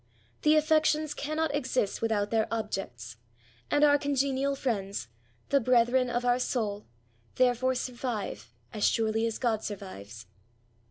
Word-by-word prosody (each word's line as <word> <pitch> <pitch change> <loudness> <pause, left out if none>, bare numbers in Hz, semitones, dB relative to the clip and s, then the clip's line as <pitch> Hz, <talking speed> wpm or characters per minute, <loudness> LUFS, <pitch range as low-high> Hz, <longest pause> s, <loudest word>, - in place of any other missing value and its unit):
The 305 +1 +4
affections 310 -1 +2
cannot 310 +1 -2
exist 260 -7 -1
without 215 -3 0
their 220 -1 +2
objects; 130 - -4 0.5
and 290 - +3
our 290 -1 +6
congenial 275 -1 0
friends 200 - -3 0.2
— 115 0 -37
the 280 - +5
brethren 250 +1 +3
of 245 0 -1
our 245 0 +3
soul 210 -5 -2 0.2
— 115 0 -36
therefore 255 +1 +2
survive 235 - -4 0.2
as 210 - -3
surely 225 0 +2
as 225 - -3
God 225 -4 0
survives. 115 - -8
240 Hz, 140 wpm, -29 LUFS, 205-275 Hz, 0.5 s, our